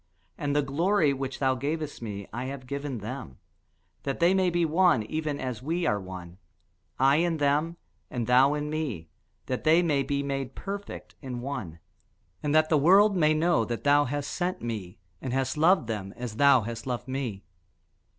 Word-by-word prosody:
And 145 -1 -2
the 145 - +3
glory 155 +2 +2
which 135 0 -4
thou 130 -1 +2
gavest 150 +3 -3
me 100 -3 -6
I 120 +2 -3
have 130 -1 -6
given 140 0 -4
them; 110 - -7 0.6
that 135 -1 -3
they 175 +2 +4
may 190 -1 +3
be 175 -1 +1
one, 165 -7 +3
even 150 +4 -3
as 125 -4 -4
we 165 +5 -1
are 105 -9 +1
one: 90 -1 -9 0.6
I 135 +2 +4
in 170 0 +1
them, 150 +3 +1 0.3
and 120 -2 -3
thou 130 +4 +5
in 150 0 -3
me, 130 - -3 0.4
that 130 - -3
they 160 +3 +5
may 150 -5 +2
be 140 +1 -1
made 135 -2 -3
perfect 200 0 -7
in 130 -3 -5
one; 120 - -5 0.6
and 150 0 0
that 155 0 +4
the 155 - +4
world 195 +7 +6
may 155 -3 +3
know 160 -6 +2
that 120 0 -4
thou 145 0 +4
hast 145 +2 -3
sent 180 0 -2
me, 110 -4 -5 0.2
and 130 -2 -3
hast 135 +2 0
loved 165 0 +4
them, 105 -4 -5
as 120 -3 -6
thou 140 -2 +6
hast 115 +3 -6
loved 125 0 -3
me. 130 -7 -4
140 Hz, 185 wpm, -27 LUFS, 120-155 Hz, 0.6 s, world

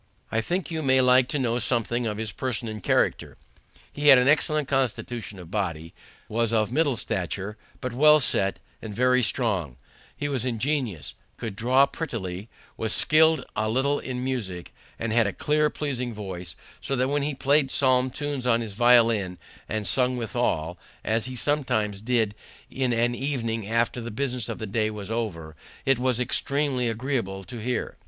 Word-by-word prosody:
I 115 - +1
think 175 +10 -2
you 160 -1 -2
may 130 -2 +4
like 125 0 +5
to 145 - -2
know 120 -3 0
something 120 0 0
of 105 -1 -3
his 110 -1 -2
person 125 -2 -2
and 110 -1 -6
character. - - 0 0.6
He 145 0 -1
had 135 -2 +10
an 125 +1 +3
excellent 150 0 +2
constitution 120 -5 -2
of 90 -2 -11
body, 85 -6 -3 0.3
was 115 0 0
of 110 -1 +1
middle 145 -1 +2
stature, 95 +2 -3 0.3
but 125 -2 -3
well 150 +4 +6
set, 100 -7 0 0.2
and 105 -2 -7
very 125 +2 +3
strong; 105 - -1 0.4
he 145 - -2
was 135 -5 -1
ingenious, 125 - -2 0.2
could 110 -4 -5
draw 125 +6 +4
prettily, 110 - -5 0.3
was 110 -1 -1
skilled 160 +1 +4
a 110 0 0
little 135 +5 +1
in 125 -1 -4
music, 105 -10 -4 0.2
and 115 -1 -2
had 115 -2 +4
a 100 - -3
clear, 150 0 +1
pleasing 125 -7 -3
voice, 90 -4 -6 0.3
so 135 - -2
that 130 +1 +1
when 145 +1 +1
he 145 0 -2
played 140 +1 +2
psalm 130 -2 +3
tunes 140 -1 -3
on 115 -1 +4
his 110 -3 -5
violin 115 -5 +4 0.3
and 110 -1 -2
sung 125 +6 +2
withal, 110 - -1 0.2
as 110 0 0
he 130 0 -6
sometimes 110 -7 0
did 115 -3 +1 0.4
in 130 -2 0
an 120 +1 +1
evening 115 -5 -2
after 115 +2 0
the 120 - -5
business 125 -1 -3
of - - -4
the 110 - -5
day 110 +1 0
was 105 -1 -7
over, 85 -9 -4 0.3
it 135 -2 +3
was 125 -1 +1
extremely 130 0 +1
agreeable 115 -5 -2
to 120 +5 -8
hear. 125 +1 -3
120 Hz, 175 wpm, -25 LUFS, 110-130 Hz, 0.6 s, had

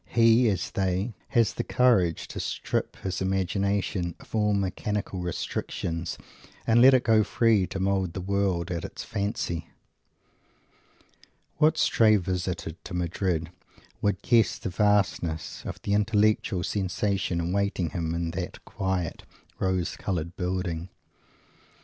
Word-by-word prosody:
He, 115 +1 +5
as 95 -4 -2
they, 95 +4 -1
has 115 -4 +2
the - - -2
courage 100 -10 +2
to - - -6
strip - - -2
his 95 -1 -4
imagination 95 -1 0
of - - -17
all 105 -1 +2
mechanical 100 0 -2
restrictions 85 -1 -3 0.5
and 115 +1 +5
let 130 +1 +8
it 125 - +2
go 110 -2 +4
free 110 -3 +3
to 95 - -5
mould 95 -2 0
the - - -4
world 95 -2 0
at 85 -1 -3
its - - -6
fancy. 100 -5 -3 1.9
What 155 +1 +4
stray 110 -2 +5
visitor 90 -3 -2
to - - -8
Madrid 85 -1 -1 0.5
would 100 -2 0
guess 115 -2 +3
the 110 - -4
vastness 90 -4 +1
of - - -5
the 100 - 0
intellectual 105 -2 +2
sensation 95 -2 -1
awaiting 90 -1 0
him 85 0 -2
in 85 -1 -2
that 90 0 -6
quiet, 95 -4 -2 0.4
rose 95 -1 0
coloured 85 -2 -3
building? 90 -2 -2
95 Hz, 130 wpm, -27 LUFS, 90-105 Hz, 1.9 s, let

